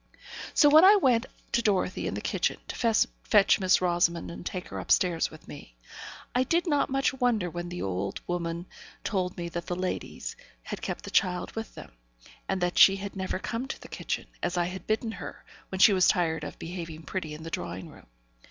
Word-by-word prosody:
So 295 - +7
when 310 +3 +8
I 400 +3 +9
went 260 - +3 0.2
to 235 - +2
Dorothy 195 -4 0
in - - -3
the - - -4
kitchen, - - 0
to - - -4 0.5
fetch 205 -3 +5
Miss 185 -1 +4
Rosamond 175 -1 +1
and 170 - -8
take 180 0 -5
her - - -5
upstairs 175 -3 +2
with 155 - -15
me, - - -11 0.6
I 250 - +3
did 335 +7 +1
not 290 -5 +1
much 270 +1 +1
wonder 240 -9 +1
when 175 +1 -5
the 175 0 -5
old 95 +1 -2
woman 170 -1 -3 0.4
told 185 -3 -1
me 170 -1 -3
that 170 0 -5
the 175 - -2
ladies 185 0 -4 0.3
had - - -6
kept - - -4
the - - -8
child 180 -2 +1
with 225 0 -6
them, - - -10 0.6
and 195 - 0
that 175 0 +1
she 195 - +9
had 200 +1 -6
never 190 -1 -2
come 230 +6 -4
to - - -5
the - - -11
kitchen, - - -4 0.2
as 175 +1 -1
I 175 - +2
had 185 +2 -6
bidden 220 +1 0
her, - - -8 0.2
when 190 - -4
she 200 +2 +7
was 185 -1 +4
tired 160 -5 +1
of 145 - -7
behaving 165 -2 -7
pretty 160 -4 -4
in 155 - -10
the 165 - -7
drawing 85 +1 -4
room. - - -16
180 Hz, 210 wpm, -28 LUFS, 170-220 Hz, 0.6 s, I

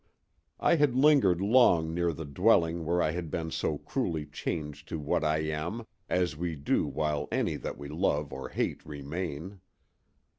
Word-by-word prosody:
I 170 - +4
had 145 -5 +3
lingered 130 - +5
long 100 -7 +4
near 85 0 +1
the 80 0 -6
dwelling 85 0 +2
where 85 +2 +2
I 75 - +1
had 85 -1 -4
been 80 0 -3
so - - -1
cruelly 80 -2 -2
changed 75 -1 -5
to - - -3
what 75 +1 0
I 75 0 +2
am, 80 +9 -3 0.2
as 90 -4 +1
we 85 +1 -3
do 70 -1 0
while 75 -1 -1
any - - 0
that - - -5
we 70 - -7
love 75 -2 -1
or 65 0 -6
hate - - -2
remain. 80 +5 -5
80 Hz, 170 wpm, -29 LUFS, 75-90 Hz, 0.2 s, lingered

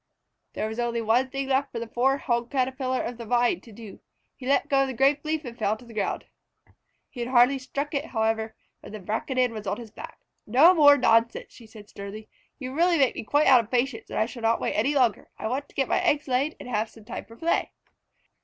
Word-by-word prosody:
There 215 - -2
was 220 +2 -6
only 235 -1 -1
one 225 +1 +3
other 260 0 -3
thing 275 0 -4
left 275 +1 +1
for - - -6
the 230 - -3
poor 255 +4 +1
Hog 240 -3 -1
Caterpillar 260 -1 -1
of 240 0 -6
the 235 - -6
Vine 245 - +2
to 230 - -15
do. 215 -1 -11 0.4
He 255 - -9
let 280 - +2
go 275 -1 +3
of 270 - +1
the 260 - -5
grape 275 +3 +2
leaf 310 -1 -2
and 235 -1 -7
fell 215 -2 -1
to 245 - -16
the 235 - -13
ground. 210 -2 -2 0.9
He 255 - -10
had 240 +1 -3
hardly 255 +2 +4
struck 280 +3 -4
it, 285 +1 -1
however, 220 -1 -1 0.2
when - - -12
the 215 - -6
Braconid 245 +6 -1
was 215 -2 -7
on 195 - -1
his 230 -3 -10
back. - - -10 0.3
"No 280 +11 +6
more 290 -4 +7
nonsense," 230 -2 +2
said 230 -3 -15
she 215 -2 -12
sternly. 205 +1 -9 0.3
"You 260 -1 -6
really 340 +3 +3
make 270 -4 +3
me - - -6
quite 290 +7 +2
out 260 -2 +7
of 215 - -16
patience, 245 -1 -1
and - - -5
I 220 - +2
shall 235 +1 -9
not 225 0 +2
wait - - -2
any 275 +8 +1
longer. 245 -7 +1
I - - -4
want 270 +5 -3
to - - -23
get 270 -2 0
my - - +1
eggs 295 +1 +1
laid 270 +4 0
and - - -9
have 220 -2 -1
some 220 -2 -17
time - - -7
for 230 - -15
play." 330 +8 0
245 Hz, 245 wpm, -26 LUFS, 225-275 Hz, 0.9 s, more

